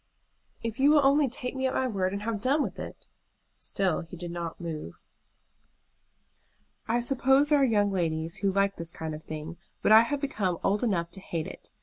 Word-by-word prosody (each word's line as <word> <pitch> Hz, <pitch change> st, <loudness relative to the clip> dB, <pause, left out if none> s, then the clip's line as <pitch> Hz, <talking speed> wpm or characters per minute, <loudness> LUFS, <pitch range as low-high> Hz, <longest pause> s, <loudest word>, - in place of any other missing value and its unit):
"If 230 Hz, +2 st, -4 dB
you 280 Hz, +2 st, +5 dB
will 295 Hz, -2 st, +5 dB
only 280 Hz, 0 st, +4 dB
take 250 Hz, +1 st, -5 dB
me 265 Hz, 0 st, 0 dB
at 260 Hz, -, -2 dB
my 260 Hz, -, +1 dB
word 190 Hz, -5 st, -1 dB
and 200 Hz, +1 st, -4 dB
have 220 Hz, -2 st, -2 dB
done 280 Hz, +5 st, +2 dB
with -, -, -5 dB
it!" -, -, -8 dB, 0.5 s
Still 190 Hz, -4 st, -1 dB
he 175 Hz, +1 st, -10 dB
did 175 Hz, 0 st, -6 dB
not 170 Hz, -1 st, -5 dB
move. 155 Hz, -, -6 dB, 1.9 s
"I 235 Hz, +2 st, +2 dB
suppose 270 Hz, +3 st, +3 dB
there 295 Hz, -1 st, +5 dB
are -, -, +5 dB
young 205 Hz, -5 st, +3 dB
ladies 165 Hz, -3 st, -1 dB
who 200 Hz, -1 st, +1 dB
like 195 Hz, +1 st, +1 dB
this 165 Hz, 0 st, -5 dB
kind 160 Hz, -2 st, -5 dB
of 155 Hz, -, -7 dB
thing, 155 Hz, +2 st, -7 dB, 0.3 s
but -, -, +3 dB
I 220 Hz, +1 st, +10 dB
have 285 Hz, +5 st, -1 dB
become 205 Hz, -, -1 dB
old 205 Hz, +3 st, +1 dB
enough 170 Hz, -7 st, 0 dB
to 195 Hz, -, -5 dB
hate 165 Hz, -4 st, -4 dB
it. -, -, -10 dB
200 Hz, 205 wpm, -28 LUFS, 170-260 Hz, 1.9 s, I